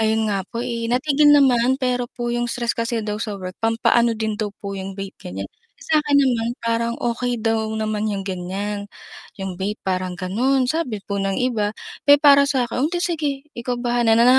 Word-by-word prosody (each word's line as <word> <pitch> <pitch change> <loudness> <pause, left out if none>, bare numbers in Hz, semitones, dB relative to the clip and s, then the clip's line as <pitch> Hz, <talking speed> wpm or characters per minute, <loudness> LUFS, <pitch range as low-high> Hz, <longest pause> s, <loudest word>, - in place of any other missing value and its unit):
Ayun 220 0 +1
nga 195 - 0
po, 235 0 -4
eh, 235 -2 -3
natigil 290 +4 +3
naman, 260 -2 +4
pero 250 -1 0
po 240 -1 -4
'yung 240 0 0
stress 240 0 -1
kasi 230 0 -1
daw 210 0 -3
sa 210 -3 -3
work, 185 -1 -7
pampaano 230 +1 +3
din 220 -1 -1
daw 215 - 0
po 200 - -4
'yung 195 0 -6
vape 195 -1 -6
ganiyan. 95 +2 -6 0.3
Eh, - - -14
sa'kin 295 -2 +3
naman 235 -4 +1
parang 230 0 0
okey 240 0 -1
daw 225 0 +1
naman 215 -1 -1
'yung 195 -1 -3
ganiyan, 195 +2 -4 0.5
'yung 190 -1 -4
vape 205 +3 -2
parang 185 -1 -1
gano'n, 250 +8 +1
sabi 285 -10 -1
po 200 -1 -2
ng 195 0 -1
iba. 225 -5 +1 0.4
Pero 285 0 +8
para 280 -1 +7
sa'kin, 250 -2 0
"Eh, - - -1
di 350 - -1
sige, 315 -5 0 0.2
ikaw 245 +1 -3
bahala," 240 -2 +2
na 235 - +6
230 Hz, 195 wpm, -22 LUFS, 205-250 Hz, 0.5 s, Pero